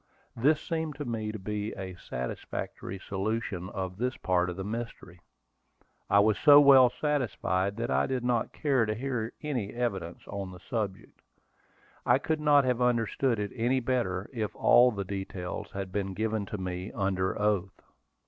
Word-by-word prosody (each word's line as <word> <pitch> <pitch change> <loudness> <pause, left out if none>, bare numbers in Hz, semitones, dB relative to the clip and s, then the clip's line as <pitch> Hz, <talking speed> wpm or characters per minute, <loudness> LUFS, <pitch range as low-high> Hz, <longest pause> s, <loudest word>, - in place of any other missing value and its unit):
This 150 +6 +3
seemed 160 -3 -3
to 145 0 -5
me 110 -3 -3
to 110 - -6
be 105 +2 -4
a 95 -1 -5
satisfactory 90 +5 -5
solution 100 -2 -2
of 95 -2 -5
this 125 +3 -1
part 90 -1 +1
of 90 - -4
the 95 - -5
mystery. 105 -4 -6 0.9
I 100 +1 +6
was 105 0 +2
so 145 -1 +9
well 135 -3 +8
satisfied 115 -9 -1
that 115 +1 -2
I - - +2
did 130 -2 -2
not 120 -2 0
care 135 -7 +1
to 110 - -1
hear 120 -2 -2
any 125 -9 -2
evidence 95 -8 -3
on 100 -2 -5
the 90 - -11
subject. 100 -2 -5 0.8
I - - +4
could 160 -1 -1
not 145 -2 +5
have 125 -1 0
understood 120 +1 +1
it 105 -1 -3
any 125 +2 +1
better 115 -7 -1
if 110 -4 -3
all 125 +1 +6
the 100 -3 -4
details 95 -2 -5
had 95 -1 -5
been 95 -1 -2
given 110 -1 -1
to 105 - -4
me 90 +1 -4
under 95 -2 -1
oath. 100 -3 0
110 Hz, 165 wpm, -29 LUFS, 95-125 Hz, 0.9 s, so